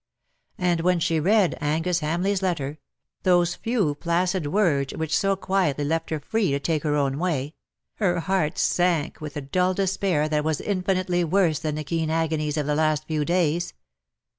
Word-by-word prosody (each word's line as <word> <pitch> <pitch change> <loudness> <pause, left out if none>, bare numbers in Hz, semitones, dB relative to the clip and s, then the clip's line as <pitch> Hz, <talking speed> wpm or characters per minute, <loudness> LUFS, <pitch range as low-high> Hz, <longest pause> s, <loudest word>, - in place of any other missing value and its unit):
And 175 -2 +1
when 180 0 +2
she 165 0 +1
read 195 +3 +3
Angus 165 +4 0
Hamleigh^s 180 +6 0
letter 155 -6 -2 0.2
— - - -60
those 175 -2 +3
few 220 -10 0
placid 170 +2 0
words 145 -6 +1
which 160 -1 -1
so 195 -1 +2
quietly 185 -7 0
left 165 +2 -1
her 155 - -2
free 205 +7 0
to 140 0 0
take 155 +1 -1
her 150 -1 0
own 140 -1 0
way 155 -5 -1 0.2
— - - -61
her 180 -5 +1
heart 180 -3 0
sank 175 -4 +1
with 150 -1 -6
a - - -3
dull 180 +7 0
despair 190 -5 0
that 150 -1 0
was 155 -1 0
infinitely 185 -2 0
worse 170 -2 +2
than 155 -2 -2
the 155 - -3
keen 160 +1 -2
agonies 160 -2 -1
of 150 - 0
the 150 - 0
last 155 0 +1
few 155 -1 -1
days. 170 0 0
165 Hz, 185 wpm, -24 LUFS, 150-185 Hz, 0.2 s, read